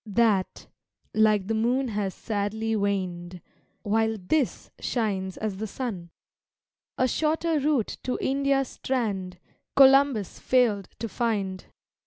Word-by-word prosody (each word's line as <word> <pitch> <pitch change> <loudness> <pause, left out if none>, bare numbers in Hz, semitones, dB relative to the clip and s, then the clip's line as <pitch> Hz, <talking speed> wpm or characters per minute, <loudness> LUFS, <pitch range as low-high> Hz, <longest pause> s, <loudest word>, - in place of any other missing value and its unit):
That 210 -3 +1 0.5
like 215 -2 +3
the 225 - -1
moon 245 +4 +1
has 205 -3 -2
sadly 220 +1 -2
waned, 185 -3 -2 0.4
While 220 +1 +1
this 240 +8 -1
shines 195 -6 -2
as 210 -3 -3
the 220 +2 -4
sun. 200 -7 -5 0.9
A 255 - +3
shorter 320 +3 +1
route 280 -6 0
to 255 - -2
India's 275 -1 +1
strand 200 -8 -2 0.4
Columbus 270 -6 +5
failed 225 -7 +2
to 230 - -4
find. 200 -5 -2
220 Hz, 115 wpm, -26 LUFS, 195-255 Hz, 0.9 s, Columbus